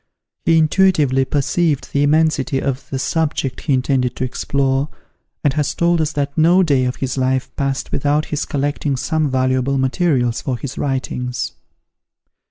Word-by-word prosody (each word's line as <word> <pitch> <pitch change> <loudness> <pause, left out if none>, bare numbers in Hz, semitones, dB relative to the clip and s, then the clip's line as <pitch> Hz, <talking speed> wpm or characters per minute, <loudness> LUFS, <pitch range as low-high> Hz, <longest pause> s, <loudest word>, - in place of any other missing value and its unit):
He 165 -1 +4
intuitively 155 -5 +3
perceived 145 +2 0
the 140 - +2
immensity 150 -1 +2
of 135 0 -3
the 135 - -3
subject 145 -2 -1
he 145 - 0
intended 130 -1 +1
to - - -3
explore, 135 +2 0 0.5
and 145 -3 +2
has 150 0 -1
told 170 -1 +2
us 155 -1 -1
that 140 -1 -2
no 170 +4 +5
day 140 -6 +2
of 125 - -1
his 135 0 -3
life 130 0 -1
passed 135 -1 -2
without 145 +2 +1
his 150 - 0
collecting 145 0 -1
some 155 +3 0
valuable 130 +1 +1
materials 130 -3 +1
for 130 -3 -2
his 140 +2 -6
writings. 125 -2 -2
140 Hz, 155 wpm, -19 LUFS, 130-155 Hz, 0.5 s, no